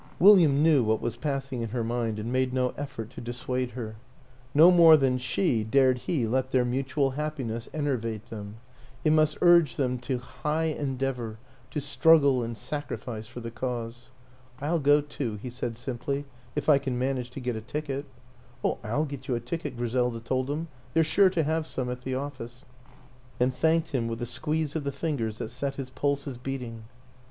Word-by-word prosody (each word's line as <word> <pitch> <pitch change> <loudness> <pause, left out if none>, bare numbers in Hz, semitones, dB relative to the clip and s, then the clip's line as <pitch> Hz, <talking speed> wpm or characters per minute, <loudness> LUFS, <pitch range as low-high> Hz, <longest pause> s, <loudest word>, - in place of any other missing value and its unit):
William 170 -7 +7
knew 155 -6 +5
what 110 0 +1
was 120 - -3
passing 135 -4 -3
in 115 - -3
her 120 +1 -2
mind 115 -1 -1
and 110 +3 -4
made 130 0 +1
no 125 -1 +2
effort 135 -6 -6
to - - -8
dissuade 125 +1 -3
her. 110 -3 -6 0.5
No 160 +5 +8
more 165 -3 +8
than 130 -3 +2
she 125 - +1
dared 130 +2 +3
he 130 -1 0
let 130 +3 0
their 130 -2 +2
mutual 135 +2 0
happiness 130 -6 -4
en 155 -2 -2
ervate 115 -5 -2
them 105 -1 -7 0.5
it 155 - +5
must 155 -1 +3
urge 170 -4 +6
them 125 -2 0
to 125 +1 -2
high 155 +5 -2
en 140 -4 -3
deavor, 125 -4 -2 0.3
to 150 - -3
struggle 140 -1 +4
and 115 -1 -4
sacrifice 120 -4 -5
for 120 +1 -9
the 115 0 -6
Cause. 120 0 -5 0.3
" 130 0 -27
I'll 160 +4 0
go 145 +1 +5
too," 140 -6 -4
he 125 +3 -6
said 120 -2 -4
simply, 135 +3 -3 0.2
" 120 -1 -27
if - - -2
I 145 -3 +6
can 130 -3 -3
manage 130 -1 -1
to 125 - -8
get 125 -2 -2
a 110 - -4
ticket." 140 +3 -4 0.3
" 120 0 -27
Oh, - - 0
I'll 130 +9 0
get 140 -2 -8
you 125 - 0
a - - -1
ticket," 125 +3 -5
Griselda 120 0 0
told 130 +3 -1
him; 155 +3 -2
" - - -27
they're 165 - +5
sure 190 +5 +4
to 175 -3 0
'have 160 +1 -1
some 125 -1 -3
at 125 0 -5
the 130 0 -3
office 130 -3 -6 0.4
" 125 0 -26
and 125 +1 +2
thanked 160 +2 +2
him 120 -4 0
with 115 0 -4
a 120 - -2
squeeze 155 +5 -1
of 160 - -1
the 140 - -2
fingers 135 -7 -2
that 110 - -4
set 135 +3 -3
his 135 -2 -6
pulses 140 -2 -2
beating. 125 -4 -5
130 Hz, 205 wpm, -27 LUFS, 120-145 Hz, 0.5 s, No